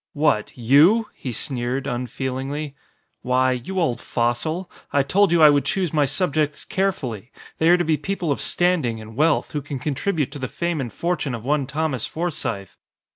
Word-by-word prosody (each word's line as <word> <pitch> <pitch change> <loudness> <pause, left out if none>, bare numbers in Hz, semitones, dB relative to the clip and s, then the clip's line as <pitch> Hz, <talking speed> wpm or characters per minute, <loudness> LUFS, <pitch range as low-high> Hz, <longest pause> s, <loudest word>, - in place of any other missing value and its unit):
"What? 145 -8 +1
You?" 155 - +5
he 130 - -6
sneered, 125 +2 -2
unfeelingly. 130 +3 -3 0.5
"Why, 130 +1 +2
you 130 +10 -3
old 130 -9 +1
fossil! 130 +10 -1 0.2
I 140 - +3
told 195 +6 +3
you 170 -2 +5
I 150 - +9
would 145 -1 +2
choose 190 -6 -1
my 150 -2 +3
subjects 150 -1 0
carefully. 130 - -2 0.3
They 160 - +4
are 175 - +7
to 175 - 0
be 155 -1 +2
people 175 0 -2
of 140 - -1
standing 165 -11 +1
and 110 0 -11
wealth, 155 +3 +2
who 150 - -2
can 140 0 -5
contribute 145 +3 -1
to 145 - -7
the 130 - -3
fame 170 -1 -2
and 120 -4 -4
fortune 160 -3 -2
of 115 - -8
one 140 -1 +1
Thomas 145 -3 -1
Forsythe." 140 - -3
145 Hz, 180 wpm, -22 LUFS, 125-165 Hz, 0.5 s, I